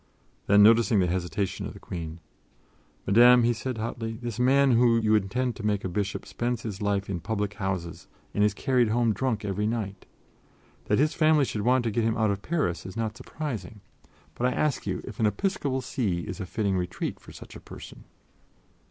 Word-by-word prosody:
Then, 100 +1 +6
noticing 115 +1 +5
the 90 - +3
hesitation 90 +2 -2
of - - -9
the - - -12
Queen: 85 -1 -7 0.8
"Madame," 120 +4 +6
he 120 +1 +3
said 125 +1 -4
hotly, 115 0 -4
"this 120 -2 -5
man 135 +2 +4
whom 115 -1 +4
you 110 0 +3
intend 115 +5 0
to 110 - -8
make 105 -2 0
a - - -1
bishop 100 +2 -3
spends 120 -1 -3
his 105 -2 -5
life 100 -1 0
in 95 -3 -3
public 105 +2 -2
houses 95 -4 -4 0.3
and 105 - +2
is 105 -1 +2
carried 125 -2 +2
home 115 0 +2
drunk 115 -3 -2
every 105 +1 -1
night. 105 -4 -4 0.8
That 105 - +2
his 150 +3 +2
family 155 -3 +4
should 105 - -3
want 125 +3 +3
to 115 - -1
get 115 +2 0
him 115 +1 0
out 110 -2 +2
of 100 0 -3
Paris 120 - -1
is 95 +4 -9
not 110 -1 -2
surprising, 125 -8 -6 0.5
but 125 - 0
I - - +1
ask 150 -4 -1
you - - -2
if - - -9
an 110 - +3
episcopal 140 - -1
see 110 -9 -2
is 85 - -7
a 95 - -5
fitting 100 0 -1
retreat 90 0 -3
for - - -14
such - - -12
a - - -8
person." - - -12
110 Hz, 200 wpm, -27 LUFS, 100-125 Hz, 0.8 s, Then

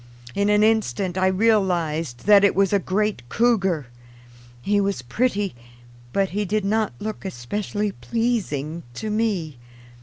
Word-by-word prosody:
In 200 +1 +1
an 210 0 +4
instant 200 - +1
I 185 0 +2
realized 180 - +1
that 205 -1 +7
it 200 - +4
was 195 0 +2
a 200 - +4
great 205 - -1
cougar. 195 - +2 0.7
He 205 +10 +1
was 200 -9 -1
pretty, 205 - 0 0.6
but 195 +4 +1
he 205 +3 -1
did 205 +1 -1
not 215 - +1
look 215 0 -5
especially 200 - -3
pleasing 190 - -2
to 215 - -4
me. 195 - -1
200 Hz, 140 wpm, -23 LUFS, 175-215 Hz, 0.7 s, that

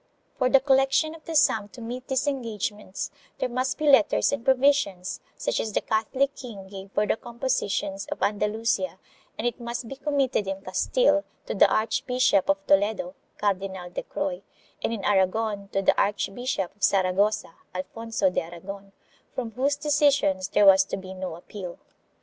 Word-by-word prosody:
For 255 -1 +3
the 270 - +6
collection 270 +3 +3
of 320 -1 -14
the 330 - -5
sum 215 -8 +3
to 250 - -13
meet 245 +2 -6
these 265 +1 0
engagements 215 -7 -3 0.3
there - - 0
must 255 +2 -1
be 305 - -1
letters 285 +1 +5
and 280 -5 -2
provisions 265 -9 +2 0.2
such - - -1
as 220 - -3
the - - +1
Catholic 255 +6 0
king 215 -7 -9
gave 195 0 -9
for 210 - +2
the - - +1
compositions 230 -5 -2
of - - -4
Andalusia, 210 -2 0 0.4
and 225 - -3
it 240 - -1
must 235 0 -5
be 270 - -6
committed 270 -6 0
in 195 0 -4
Castile 295 - +2 0.2
to - - -3
the - - +5
Archbishop 225 -2 +2
of 195 0 +1
Toledo 195 -2 +2 0.2
(Cardinal 190 -3 -2
de - - -3
Croy), 180 -1 -3 0.4
and - - 0
in 220 -4 -4
Aragon 200 +1 +1
to 195 0 -1
the - - +4
Archbishop 200 0 -1
of 205 - -34
Saragossa 190 0 +2 0.2
(Alfonso 220 +1 -1
de - - 0
Aragon) 195 +4 -9 0.4
from 235 -3 -3
whose 270 +5 +1
decisions 285 - +2
there 205 - +3
was 195 0 +8
to 195 - -4
be 190 -1 -8
no 185 -3 -5
appeal. 180 +1 -8
215 Hz, 165 wpm, -26 LUFS, 195-260 Hz, 0.4 s, was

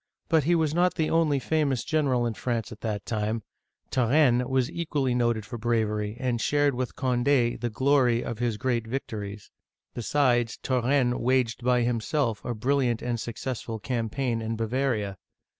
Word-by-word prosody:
But 160 -4 +3
he 175 +2 +4
was 160 -3 +1
not 180 +2 +2
the 160 -3 0
only 160 -3 +3
famous 140 -2 0
general 145 -6 +1
in 115 - -1
France 120 +1 -3
at 110 - -10
that 105 -3 -3
time; 110 +2 -2 0.5
Turenne 125 -3 +1
(tii - - 0 0.3
ren') - - -8
was 130 -1 +1
equally 145 -6 -1
noted 120 -3 +1
for 115 +3 -7
bravery, 110 -2 0
and 125 -3 -1
shared 145 +2 +2
with 125 0 -3
Cond6 125 -2 +1
the 120 - -1
glory 130 -1 +2
of 115 -2 -5
his 120 -3 0
great 120 -2 -1
victories. 105 -5 -5 0.4
Besides, 120 -1 +1
Turenne 125 -1 +1
waged 125 -1 +1
by 125 -1 +3
himself 120 0 -1
a 120 - -3
brilliant 125 0 +1
and 120 -1 -1
successful 115 0 -4
campaign 115 +1 -2
in 115 0 -2
Bavaria. 115 -3 -1
120 Hz, 165 wpm, -27 LUFS, 115-135 Hz, 0.5 s, he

